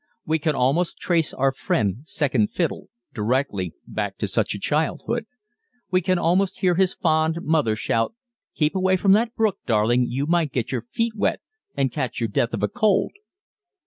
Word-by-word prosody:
We 160 +1 +1
can 155 -1 0
almost 140 +8 +1
trace 165 -3 0
our 135 +1 +1
friend 105 -6 0
"Second 135 -9 +1
Fiddle" - - -2 0.2
directly 105 - -1
back - - -4
to - - -2
such - - 0
a - - -6
childhood. 160 - -1 0.6
We 185 0 +3
can 185 +1 +1
almost 180 +3 +1
hear 180 -2 +3
his 185 +1 +2
fond 160 0 +1
mother 150 -9 +2
shout, 115 - -1 0.4
"Keep 150 +2 +1
away 185 0 +2
from 195 +2 +3
the 225 +4 +4
brook, 215 -3 +1
darling, 120 +3 +3
you 135 +4 -1
might 165 -2 +1
get 125 -2 -2
your 125 -3 -1
feet 230 - -1
wet 205 - 0 0.4
and 135 -2 +1
catch 130 -6 -3
your 115 -2 -1
death 115 +4 0
of - - -5
a - - +4
cold." 215 -3 +1
155 Hz, 175 wpm, -23 LUFS, 125-185 Hz, 0.6 s, the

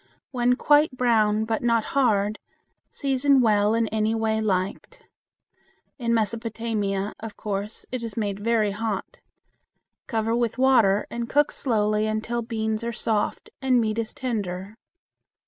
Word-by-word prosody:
When 245 -1 +2
quite 295 0 +3
brown 220 -3 +2
but 225 0 -1
not 230 -2 +2
hard, 215 -6 +2 0.5
season 275 0 +2
well 215 -2 +3
in 230 -1 +1
any 220 +1 0
way 220 -1 0
liked. 200 - -2 0.9
In 235 -2 -1
Mesopotamia, 220 -3 -1
of 220 -2 -8
course 205 0 -4
it 255 -1 -3
is 230 -2 -6
made 205 -3 -2
very 220 -1 +1
hot. 210 -1 -4 0.9
Cover 225 -1 0
with 235 -1 -1
water 230 -7 +4
and 235 0 -4
cook 295 +1 +3
slowly 215 -3 0
until 220 +2 -2
beans 220 -1 -2
are 235 - -2
soft 220 -2 -2
and 260 -2 +3
meat 220 -1 0
is 225 -1 -3
tender. 200 -5 -4
225 Hz, 135 wpm, -25 LUFS, 210-240 Hz, 0.9 s, water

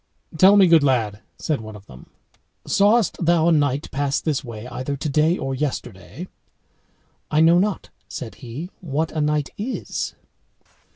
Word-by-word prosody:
"Tell 190 +5 +6
me, 195 - +7
good 165 -3 +6
lad," 115 -7 0 0.2
said 150 -7 -2
one 110 -1 -9
of 100 -1 -13
them, 65 -6 -14 0.6
"sawest 205 -1 +2
thou 170 -1 +3
a - - +5
knight 145 -2 +1
pass 140 0 0
this 150 -3 -2
way 115 -3 -8
either 130 +3 -4
today 155 +4 +1
or 135 0 -3
yesterday?" 130 - -5 1.0
"I 150 - +1
know 170 +2 +6
not," 205 +1 -2 0.2
said 120 -3 -7
he, 135 +10 -7
"what 160 -1 -2
a 155 - -2
knight 150 -1 0
is." 240 +6 -4
150 Hz, 155 wpm, -22 LUFS, 130-170 Hz, 1.0 s, me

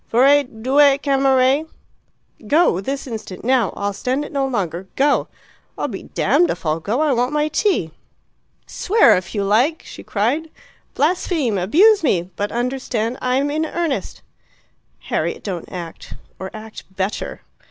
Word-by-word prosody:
"Vorrei 275 +5 +5
due 270 +3 +3
camere 270 +1 +2 0.4
" 220 - -22
"Go. 290 - +3
This 275 +7 -4
instant. 220 -7 -7
Now. 250 -5 +2
I'll 200 0 -2
stand 260 +8 -2
it - - -10
no 275 -2 0
longer. 190 -7 -3
Go!" 285 +1 +2 0.5
"I'm - - -2
damned 350 - +1
if - - -4
I'll 155 +1 0
go. 215 - -1
I 305 -3 +2
want 250 +3 0
my 300 0 +1
tea." 310 - 0 0.7
"Swear 440 +4 +4
if 185 +4 -4
you 200 - 0
like!" 245 +11 +2
she - - -10
cried. 255 +11 -1 0.5
"Blaspheme! 300 - 0
Abuse 380 - +5
me! 185 - 0
But 205 +3 -2
understand, 245 -1 -2
I'm 265 +3 +1
in 310 +2 0
earnest." 325 -2 -3 0.8
"Harriet, - - -2
don't 185 -5 -5
act. 170 -3 -8 0.2
Or 190 - -5
act 220 0 -10
better." 190 +2 -3
255 Hz, 145 wpm, -20 LUFS, 205-290 Hz, 0.8 s, Vorrei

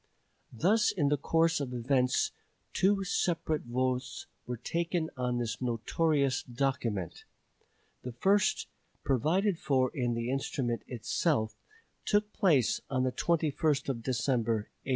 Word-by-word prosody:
Thus 205 - +3
in 150 -8 +1
the 145 - +2
course 165 +3 +2
of 130 -3 -4
events 125 +1 +1 0.4
two 195 +1 +2
separate 165 -5 -1
votes 130 +1 -2 0.2
were 125 0 -3
taken 170 +5 -2
on 125 -1 -1
this 120 0 -3
notorious 135 +3 +1
document. 120 -8 -2 0.8
The 125 - -6
first, 195 - +2 0.4
provided 165 - +1
for 130 -2 +1
in 120 -3 0
the 115 +2 -2
instrument 130 -3 -2
itself, 120 0 0 0.5
took 210 0 +1
place 155 - +3
on 130 -2 0
the 130 - +1
21st 150 -2 0
of 120 -4 -2
December, 115 -3 0
1857. - - -10
135 Hz, 125 wpm, -30 LUFS, 125-165 Hz, 0.8 s, Thus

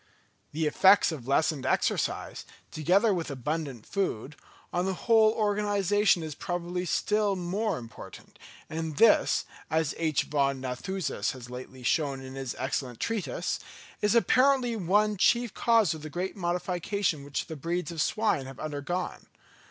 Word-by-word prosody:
The 155 +2 -1
effects 190 +5 +5
of 135 -7 -7
lessened 140 0 +1
exercise, - - -1 0.3
together 195 +8 +3
with 170 -3 -3
abundant 140 -3 -4
food, 150 - -2 0.4
on 180 +2 0
the 190 - -1
whole 220 +1 +4
organisation 205 -3 +2
is 155 -1 -5
probably 175 +3 -3
still 210 +3 +1
more 190 +3 -1
important, 115 -2 -11 0.3
and 160 -2 -4
this, 230 - +4 0.2
as 160 -2 +1
H. 160 -4 +1
von 140 -2 0
Nathusius 130 - -3
has 125 -2 -10
lately 130 +1 -9
shown 140 +1 +1
in 130 0 -9
his 135 -2 -5
excellent 130 -2 -3
Treatise, 195 - -2 0.4
is 210 +2 +2
apparently 255 0 +3
one 210 +2 +2
chief 235 +3 +3
cause 225 -7 +3
of 160 - -8
the 155 - -7
great 180 +5 -3
modification 180 -2 -1
which 140 0 -3
the 160 - -7
breeds 170 +5 -3
of 165 -2 -2
swine 210 -11 0
have 135 -1 -10
undergone. 155 +4 -4
170 Hz, 145 wpm, -28 LUFS, 140-205 Hz, 0.4 s, effects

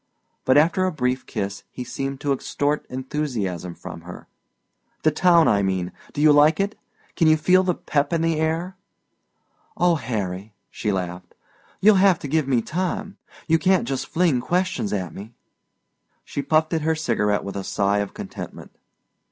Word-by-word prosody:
But 130 +2 +5
after 165 +5 +4
a 185 - 0
brief 130 -4 -1
kiss 100 0 -4
he 125 - -7
seemed 135 +1 -4
to 140 -1 +1
extort 145 +2 -2
enthusiasm 120 - -3
from - - -9
her. - - -11 0.8
"The 155 - +4
town, 170 0 +4
I 100 -2 +3
mean. 95 -2 -1 0.2
Do 145 - -2
you 155 0 +7
like 150 +2 +5
it? 200 +2 0 0.4
Can 165 - +3
you 155 0 +5
feel 180 +4 +4
the 185 -2 0
pep 145 -1 -1
in 165 -1 +1
the 165 -1 +1
air?" 165 +4 -1 1.0
"Oh, 175 -1 +4
Harry," 105 - -4 0.2
she 105 - -2
laughed, 90 -2 -4 0.5
"you'll 210 0 +6
have 190 -3 +5
to 145 - -7
give 155 0 +1
me 125 -4 +2
time. 185 +4 -3 0.3
You 165 -1 +3
can't 185 -6 +2
just 135 0 -2
fling 160 -8 +2
questions 180 - -1
at 90 -6 -3
me." 110 +4 -10 0.9
She 140 - -3
puffed 155 +3 +1
at 160 - +1
her 160 +1 +1
cigarette 105 -9 0
with 100 - -6
a 100 - -3
sigh 100 +1 +1
of 100 -1 -4
contentment. - - -8
145 Hz, 170 wpm, -23 LUFS, 105-165 Hz, 1.0 s, you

